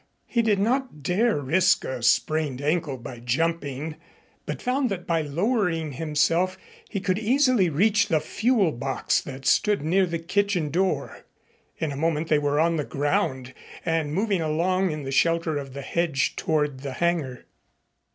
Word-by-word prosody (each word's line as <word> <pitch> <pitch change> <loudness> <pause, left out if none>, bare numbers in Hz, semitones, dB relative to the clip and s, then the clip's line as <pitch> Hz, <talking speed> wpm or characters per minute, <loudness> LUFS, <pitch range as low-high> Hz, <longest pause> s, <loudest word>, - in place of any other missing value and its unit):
He 235 - +1
did 215 -3 +2
not 235 - -1
dare 205 +4 +2
risk 165 +7 +2
a 130 -2 -4
sprained 145 +3 +1
ankle 150 -1 -1
by 120 0 -9
jumping, 150 +3 -2 0.5
but - - -4
found 255 +1 0
that 185 -3 -4
by 165 -1 +1
lowering 165 - 0
himself 165 +5 +1 0.3
he 200 - -3
could 185 +1 0
easily 245 -4 +3
reach 205 +6 +3
the 165 -6 +2
fuel 210 +3 +1
box 135 +1 -1
that 135 -1 -9
stood 210 -7 +3
near 185 +4 +2
the 170 0 -2
kitchen 180 -2 0
door. 185 +3 -1 0.5
In 160 -3 -2
a - - -5
moment 160 +1 -1
they 150 - +4
were 145 0 0
on 165 +1 +2
the 150 - 0
ground 130 -3 -1 0.3
and 165 -3 0
moving 195 +2 0
along 180 +4 +1
in 155 -2 -4
the 135 - -5
shelter 165 +1 +1
of 135 -2 -8
the 140 - -6
hedge 155 -3 0
toward 150 -4 0
the 135 -1 -5
hangar. 155 -4 -1
165 Hz, 160 wpm, -25 LUFS, 145-190 Hz, 0.5 s, they